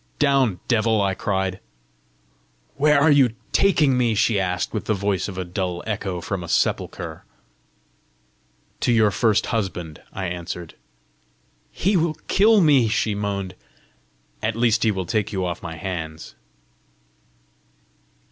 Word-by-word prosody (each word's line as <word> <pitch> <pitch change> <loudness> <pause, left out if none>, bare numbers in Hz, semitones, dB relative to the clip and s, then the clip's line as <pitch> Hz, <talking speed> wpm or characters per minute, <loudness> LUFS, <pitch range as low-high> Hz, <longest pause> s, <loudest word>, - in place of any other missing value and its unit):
"Down, 135 - +2
devil!" 110 -2 +2
I 100 -1 +1
cried. 95 -1 -2 1.2
"Where 150 0 +4
are 155 +2 +5
you 130 -6 +4 0.2
taking 150 -10 +3
me?" 120 -3 +2
she 105 0 +2
asked, 90 -1 -2
with 110 - -3
the 110 - +1
voice 100 -1 -1
of 95 -3 -7
a 95 - -3
dull 90 -1 -3
echo 95 -5 -3
from 95 0 -4
a - - -7
sepulchre. - - -1 1.6
"To - - +1
your 110 -3 +4
first 110 0 +2
husband," 90 -8 -3
I 95 - -4
answered. 85 -1 -5 1.0
"He 195 +3 0
will 165 -2 +1
kill 210 +1 +5
me!" 140 -8 +5
she 110 0 0
moaned. 100 -2 -3 0.9
"At 110 0 -1
least 115 -1 +2
he 110 - +3
will 95 -3 -2
take 110 +2 -1
you 95 -3 -2
off 85 -1 -4
my 85 -2 -6
hands!" 80 -3 -6
105 Hz, 140 wpm, -22 LUFS, 95-120 Hz, 1.6 s, are